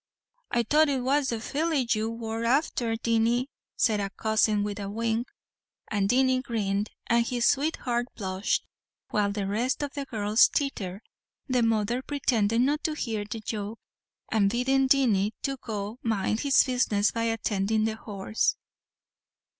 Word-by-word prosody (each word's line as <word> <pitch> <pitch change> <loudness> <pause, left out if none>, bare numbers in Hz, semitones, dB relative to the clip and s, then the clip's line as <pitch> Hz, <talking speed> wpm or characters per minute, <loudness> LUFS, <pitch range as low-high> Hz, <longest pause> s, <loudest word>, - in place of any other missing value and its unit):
"I 235 - +1
thought 300 +6 +4
it 270 -2 0
was 275 +2 +2
the 230 -3 -1
filly 290 +2 -1
you 220 -1 +1
wor 225 0 -4
afther, 240 -2 +1
Dinny," 230 +3 +1 0.3
said 215 -3 +2
a 200 -1 -2
cousin 215 0 +1
with 205 0 -4
a 200 -1 -4
wink; 230 +2 -1 0.6
and 200 -2 +1
Dinny 260 +1 +3
grinned, 210 -4 -1 0.2
and 235 0 +3
his 240 0 -1
sweetheart 260 -4 +1
blushed, 190 -1 -1 0.5
while 205 -1 +1
the 200 -1 -2
rest 235 +9 -1
of 285 - -4
the 280 -1 -4
girls 215 -2 +4
tittered, 200 -9 -3 0.5
the 255 -2 +2
mother 225 +2 +1
pretending 240 -5 +1
not 295 +2 0
to 310 - 0
hear 220 -7 -3
the 220 +2 -6
joke, 210 0 -4 0.5
and 205 -3 +3
bidding 265 +4 +2
Dinny 225 -7 +3 0.3
go 215 +1 -5
mind 220 -1 0
his 280 0 +4
business 235 -5 +1
by 230 0 -1
attending 215 -1 0
to 220 - +1
the 220 - -7
horse. 220 - -1
230 Hz, 155 wpm, -27 LUFS, 210-255 Hz, 0.6 s, thought